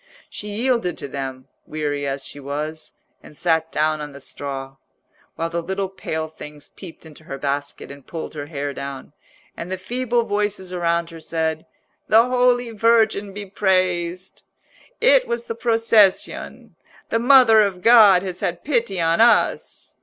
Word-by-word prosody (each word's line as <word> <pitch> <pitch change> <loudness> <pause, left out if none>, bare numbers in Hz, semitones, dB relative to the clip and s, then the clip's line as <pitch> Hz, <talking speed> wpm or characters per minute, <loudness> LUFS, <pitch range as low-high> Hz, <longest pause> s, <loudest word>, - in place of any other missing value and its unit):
She 210 - -7
yielded 225 -3 -1
to 140 - -5
them, 135 -1 -6 0.2
weary 145 -2 -3
as 135 0 -3
she 145 - -6
was, 150 +3 -5 0.3
and 150 - -14
sat 165 -1 +1
down 155 0 0
on 150 -1 -7
the 140 - -11
straw, 135 -1 -7 0.6
while 165 0 -3
the 170 0 -2
little 190 +2 -3
pale 160 -4 -4
things 150 -2 -12
peeped 175 -3 -13
into 155 0 -14
her 135 - -6
basket 140 0 -4
and 140 -1 -13
pulled 165 -2 -6
her 145 -2 -6
hair 145 -2 -4
down, 140 0 -8 0.4
and 175 +2 -7
the 190 - -2
feeble 240 +4 -1
voices 205 -3 -2
around 170 -1 -1
her 165 - -10
said, 160 0 -3 0.4
"The 225 +1 +6
Holy 245 -1 +2
Virgin 220 -2 +2
be 205 +1 -7
praised!" 185 -2 -1 0.6
"It - - +4
was 475 0 -3
the 460 - -4
procession!" 225 - +1 0.3
"The 230 - +1
Mother 245 -3 +6
of 190 -3 -1
God 210 -6 +7
has 185 -2 -5
had 175 -1 -3
pity 235 -9 -1
on 165 +3 +2
us!" 235 +1 +1
180 Hz, 160 wpm, -21 LUFS, 150-220 Hz, 0.6 s, God